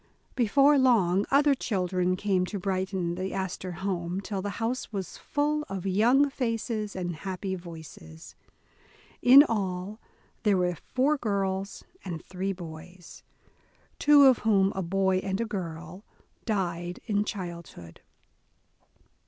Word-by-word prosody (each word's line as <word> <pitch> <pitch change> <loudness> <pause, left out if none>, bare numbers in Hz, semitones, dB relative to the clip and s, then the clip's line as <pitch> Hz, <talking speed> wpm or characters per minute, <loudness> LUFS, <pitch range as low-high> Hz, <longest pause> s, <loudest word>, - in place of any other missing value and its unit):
Before 275 +4 +4
long 200 -7 +3
other 285 +1 +4
children 185 -6 -1
came 190 -1 0
to 205 - -4
brighten 185 -2 -2
the 185 +2 -4
Astor 190 -1 -4
home, 180 -1 -2
till 195 0 -4
the 205 - -3
house 230 +3 -3
was 195 -4 -5
full 300 +1 -1
of 195 -1 -5
young 235 +9 +4
faces 230 -5 -3
and 175 -3 -4
happy 190 +2 -4
voices. 160 - -10 0.9
In 265 +3 +9
all, 200 -4 -3 0.4
there 210 -4 +3
were 180 -1 +1 0.2
four 280 +4 +3
girls 195 -3 -2 0.2
and 170 -4 -6
three 190 +1 -3
boys, 175 0 -10 0.8
two 290 -1 +6
of 260 -3 +6
whom, 200 -3 +3
a 190 - -1
boy 190 +1 +1
and 190 +1 -3
a 230 - 0
girl 175 -2 -6 0.4
died 175 -5 -2
in 205 -1 +1
childhood. 170 - -8
195 Hz, 130 wpm, -27 LUFS, 180-220 Hz, 0.9 s, In